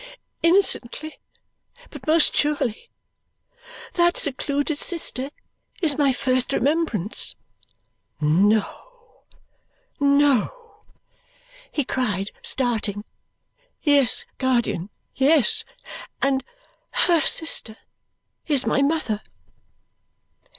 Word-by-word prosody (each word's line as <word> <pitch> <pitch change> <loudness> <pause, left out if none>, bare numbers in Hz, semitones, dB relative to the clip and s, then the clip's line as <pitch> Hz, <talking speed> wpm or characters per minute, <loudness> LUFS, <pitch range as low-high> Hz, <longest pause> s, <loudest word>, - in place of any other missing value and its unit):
Innocently, 325 -5 +1 0.7
but - - -12
most 315 0 +3
surely. 290 - -1 1.0
That 345 0 +2
secluded 285 +2 0
sister 280 -6 0 0.5
is 315 -7 +1
my 285 -3 +2
first 255 0 0
remembrance." 270 - -1 0.8
"No, 210 - -1 0.7
no!" 290 - +1 0.9
he 290 - -1
cried, 210 -7 -2
starting. 220 -5 0 0.8
"Yes, 285 -5 +3
guardian, 235 -8 0 0.2
yes! 275 -2 +3 0.6
And 270 -1 0 0.6
HER 340 -3 +3
sister 230 -9 +2 0.7
is 285 -4 +2
my - - +1
mother!" 280 -8 0
275 Hz, 75 wpm, -22 LUFS, 240-315 Hz, 1.0 s, most